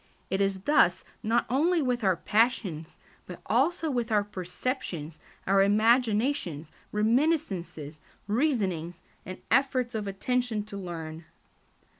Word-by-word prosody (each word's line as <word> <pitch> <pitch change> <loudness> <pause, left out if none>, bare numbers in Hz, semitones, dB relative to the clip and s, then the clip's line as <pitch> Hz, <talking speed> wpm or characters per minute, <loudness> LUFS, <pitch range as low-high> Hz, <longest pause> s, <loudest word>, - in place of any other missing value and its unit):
It 190 - +1
is 195 -1 0
thus 185 -8 +3 0.2
not 230 +1 +1
only 320 +8 +2
with 250 -5 0
our 190 -2 +3
passions, 195 -6 0 0.3
but 180 - -8
also 300 - +1
with 240 -3 -2
our 210 -1 +3
perceptions, 180 - -5 0.3
our 195 +1 +4
imaginations, 215 - +2 0.2
reminiscences, 210 - 0 0.3
reasonings, 200 - -1 0.2
and 185 - -8
efforts 255 -1 +2
of 215 -2 -3
attention 230 +2 -1
to 210 -1 -10
learn. 165 -3 -7
210 Hz, 115 wpm, -28 LUFS, 180-250 Hz, 0.3 s, our